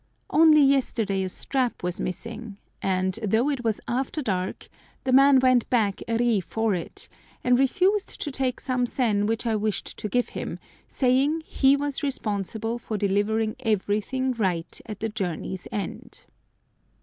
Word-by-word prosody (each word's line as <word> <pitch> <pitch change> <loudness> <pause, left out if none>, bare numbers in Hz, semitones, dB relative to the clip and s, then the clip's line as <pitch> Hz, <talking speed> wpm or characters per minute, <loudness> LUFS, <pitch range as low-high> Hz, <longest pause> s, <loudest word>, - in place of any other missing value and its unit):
Only 310 -1 +7
yesterday 235 -8 +2
a 190 - -2
strap 255 +4 -2
was 180 0 -2
missing, 225 +2 -5 0.2
and, 185 +2 0
though 220 +7 +2
it 265 -4 -3
was 225 -2 0
after 265 +5 -2
dark, 185 -4 -2 0.4
the 260 - 0
man 275 +1 +7
went 255 -2 +3
back 215 -5 +1
a 230 0 +1
ri 235 -3 +2
for 225 +3 -1
it, 175 -2 -5 0.4
and 250 0 +4
refused 375 +9 +1
to 295 - -3
take 260 -2 -1
some 250 -2 0
sen 210 -5 +1
which 225 +2 -1
I 225 -2 +1
wished 215 -1 -2
to 210 - -4
give 245 +3 +1
him, - - -5 0.3
saying 275 +5 +2
he 270 0 +4
was 285 -1 -2
responsible 225 -3 -2
for 220 -2 -4
delivering 210 +2 +1
everything 220 +5 0
right 185 -7 -2
at 210 -2 -7
the 225 - -1
journey's 190 -3 -4
end. 205 -2 -6
225 Hz, 155 wpm, -25 LUFS, 205-260 Hz, 0.4 s, Only